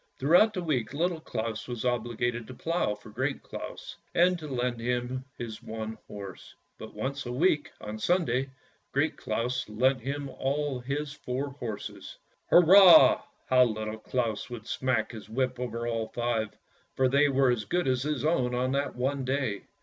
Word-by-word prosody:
Throughout 175 +11 +5
the 180 - -2
week 140 -5 -1
Little 170 +2 0
Claus 110 -6 -4
was 120 -1 -4
obliged 120 -1 -1
to 130 - -8
plough 165 -10 -1
for 105 - -14
Great - - -2
Claus, - - -8 0.2
and 180 +1 +4
to 155 - -7
lend 125 -3 -2
him 125 +2 -2
his 115 -2 -6
one 110 0 -5
horse; 100 -2 -9 0.2
but - - -9
once 140 0 -3
a - - -3
week, 150 +2 +2
on 105 +1 -6
Sunday, 135 -4 +1 0.4
Great - - +1
Claus 120 0 -2
lent 130 +4 +2
him 140 +3 -3
all 135 0 -2
his 140 +3 -3
four 135 +1 -3
horses. 120 -6 -7 0.2
" - - -42
Hurrah! 180 +1 +8
" - - -40
How 130 0 +7
Little 110 -1 -3
Claus 115 -2 -2
would 120 -3 -7
smack 130 -2 0
his 110 -3 -10
whip 125 +2 -1
over 120 -1 -3
all 115 -2 -1
five, 115 -1 -1 0.5
for 130 - +3
they 140 +3 +4
were 135 -1 +3
as 110 -4 -1
good 175 - 0
as 130 -1 +1
his 145 -1 -2
own 130 -6 +1
on 130 +1 0
that 140 +1 -1
one 135 +2 -1
day. 130 -6 -1
125 Hz, 175 wpm, -28 LUFS, 115-140 Hz, 0.5 s, Hurrah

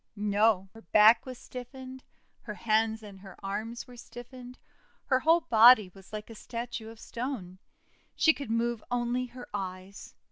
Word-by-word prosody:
No! 205 -1 +2
Her 225 - -13
back 220 +3 +5
was 255 -1 -7
stiffened; 260 +1 -9 0.4
her 210 - -6
hands 220 +1 +1
and 200 -2 -11
her 190 -1 -12
arms 220 +4 -4
were 250 - -14
stiffened; 245 +1 -11 0.5
her 260 -2 +2
whole 325 +5 +4
body 225 - +6
was 195 -1 -16
like 215 +1 -7
a - - -8
statue 230 0 -6
of 225 0 -13
stone. 230 -9 -6 0.6
She 320 - +5
could 280 -6 -8
move 230 0 -1
only 245 +1 -1
her 245 +1 -11
eyes. 190 0 -7
230 Hz, 155 wpm, -29 LUFS, 210-245 Hz, 0.6 s, body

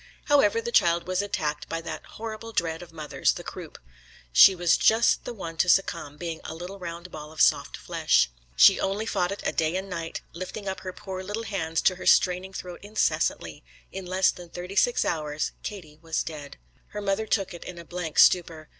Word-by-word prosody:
However, 230 -7 +4
the 235 +1 -4
child 170 -5 +3
was 185 +1 0
attacked 155 -7 -3
by 165 - -2
that 165 - -6
horrible 225 0 -7
dread 165 -2 -1
of 175 -2 -11
mothers, 150 -4 0
the - - -8
croup. - - -9 0.6
She 190 - +8
was 175 -1 +3
just 225 +2 +3
the - - -4
one 165 -5 -7
to 180 - +2
succumb, 160 -6 +1
being 165 0 -5
a 160 - -6
little 180 +4 -8
round 170 0 -7
ball 150 0 -8
of 160 - -12
soft - - +3
flesh. - - +2 0.3
She 65 - +7
only 200 +3 -1
fought 180 -5 0
it 200 - -6
a - - +1
day 160 +1 0
and 190 +1 -3
night, 165 -2 -4
lifting 185 +4 -6
up 190 - -3
her 185 - -6
poor 190 -1 -7
little 205 +4 -4
hands 165 -7 -2
to 185 - +3
her - - -6
straining 185 +1 +3
throat 180 -2 -7
incessantly. 205 - -1 0.3
In 190 -1 -7
less 185 +1 +3
than 175 -1 -12
thirty 180 +3 -7
six 245 +3 +3
hours 150 -2 -2
Katie 155 -7 -8
was 165 -1 -1
dead. 150 -3 -8 0.3
Her 210 - -6
mother 200 +2 -1
took 195 -3 0
it 175 - -9
in 180 - -8
a 170 - -9
blank 175 -3 -5
stupor. 165 -3 +4
180 Hz, 205 wpm, -26 LUFS, 165-195 Hz, 0.6 s, She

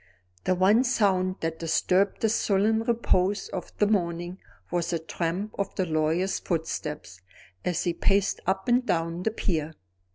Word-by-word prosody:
The 185 - +2
one 200 +7 +4
sound 195 -7 +2
that 165 0 -2
disturbed 185 +4 +1
the 225 - +3
sullen 215 +1 +2
repose 205 -4 +1
of 185 - -6
the 210 - +4
morning 175 -3 -1 0.3
was 175 -1 0
the 170 - +1
tramp 170 +5 -3
of 200 - -2
the 185 - 0
lawyer's 160 +3 0
footsteps, 150 - -4 0.4
as 180 -2 0
he 175 - 0
paced 195 +3 +1
up 190 0 0
and 245 +1 +4
down 170 -5 -1
the 220 - +1
pier. 160 -8 -2
185 Hz, 155 wpm, -27 LUFS, 165-205 Hz, 0.4 s, one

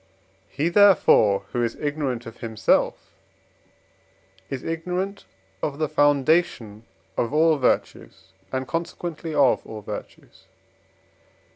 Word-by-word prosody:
He, 155 +4 -1
therefore, 175 - +5
who 120 - -1
is 115 - -2
ignorant 145 -5 -3
of 115 - -10
himself, 110 -2 0 1.4
is 130 -2 -5
ignorant 180 +4 -4 0.4
of 140 -2 -3
the 155 0 0
foundation 145 -6 +1 0.3
of 120 - -1
all 160 +2 +4
virtues, 95 -7 -2 0.2
and 130 0 -3
consequently 165 -1 -4
of 140 -3 +3
all 110 -1 -9
virtues. - - -10
145 Hz, 105 wpm, -24 LUFS, 120-165 Hz, 1.4 s, therefore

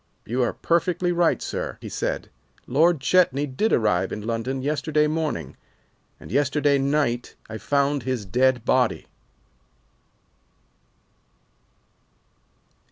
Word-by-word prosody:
"You 125 +4 -1
are 120 - +1
perfectly 175 +1 0
right, 175 -1 +2
sir," - - -4
he - - -9
said, - - -3 0.3
"Lord 155 +3 +3
Chetney 145 -3 +3
did 145 +11 -1
arrive 100 -5 +2
in 105 - -5
London 120 +3 -2
yesterday 150 +1 +1
morning, 150 - -2 0.6
and - - -12
yesterday 140 +2 +2
night 135 -3 0
I 110 0 -7
found 140 +4 +1
his 120 -3 -3
dead 125 +4 +2
body." 125 -3 +1
135 Hz, 105 wpm, -24 LUFS, 120-150 Hz, 0.6 s, Lord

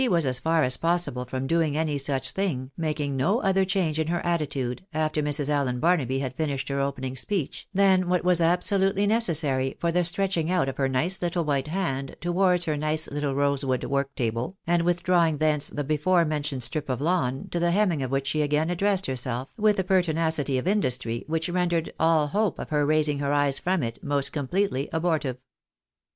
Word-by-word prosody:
243 240 -9 +3
was 165 - +2
as 130 -1 0
far 160 +3 +2
as 125 -1 +1
possible 165 -7 0
from 130 +1 -4
doing 155 0 +1
any 155 -2 0
such 140 -1 0
thing, 140 -10 -2
making 150 -4 -2
no 180 - +1
other 195 -1 +3
change 180 -5 0
in 160 - 0
her 175 +1 0
attitude, 145 -6 -2
after 155 -1 0
Mrs. 145 -1 -1
Allen 140 -4 0
Baruaby 150 -6 +1
had 130 -2 -4
finished 145 -3 -2
her 140 0 -1
opening 130 -2 -3
speech, 155 +4 -3
than 190 -2 +3
what 180 -1 +1
was 180 -1 +3
absolutely 190 +3 +2
necessary 155 - +1
for 170 - 0
the 180 +1 +2
stretch 190 +3 +2
ing 165 0 0
out 180 -6 +1
of 135 - -4
her 135 -1 +1
nice 165 +9 0
little 175 -1 -1
white 140 -1 0
hand 150 -6 -3
towards 180 0 +2
her 155 - 0
nice 155 +1 -1
little 145 -1 -2
rose 140 0 +2
wood 130 -2 -1
work 140 0 -2
table, 120 +9 -2
and 170 0 +2
withdrawing 175 -2 +2
thence 150 -1 +1
the 145 - -4
before 155 +5 +2
mentioned 150 -4 -2
strip 150 +2 -1
of 130 -2 -1
lawn, 135 -5 -1
to 175 - -1
the 175 0 +2
hemming 180 -5 +1
of 130 - -2
which 135 +1 -1
she 155 +3 0
again 150 +3 +1
addressed 195 +2 +1
herself 130 0 -2
with 210 -1 +2
a 190 - +1
pertinacity 160 -6 +1
of 130 - -3
industry 125 - 0
which 160 0 -1
rendered 175 -2 -1
all 160 -2 +3
hope 205 +6 0
of - - -7
her 150 -2 +1
raising 150 -1 +2
her 140 0 -1
eyes 145 -2 +2
from 185 -4 0
it 115 -1 -5
most 140 -1 0
completely 145 0 -1
abortive. 160 -6 -1
155 Hz, 200 wpm, -25 LUFS, 135-175 Hz, -, 243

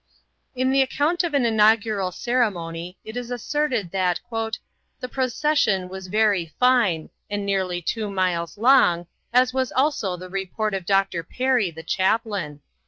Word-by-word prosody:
In 260 +1 +1
the 270 0 +4
account 300 +7 +1
of 330 -4 -1
an 270 -4 +3
inaugural 215 -3 +3
ceremony 180 -7 -2
it 220 - -9
was 245 -1 -5
asserted 245 - -1
that 185 -2 +1 0.8
"the 250 - -5
procession 255 -7 0
was 190 0 -8
very 200 -6 +1
fine, 235 -11 +3 0.2
and 205 0 -3
nearly 185 -3 -1
two 215 +4 -2
miles 180 -3 -1
long, 215 -8 +4 0.3
as 250 +1 +3
was 260 -1 -1
also 260 -10 0
the 185 +1 -9
report 195 +3 -3
of 190 -3 -4
Dr. 195 -3 +2
Perry, 250 0 0
the 160 0 -10
chaplain." 190 -5 -1
205 Hz, 145 wpm, -23 LUFS, 180-250 Hz, 0.8 s, the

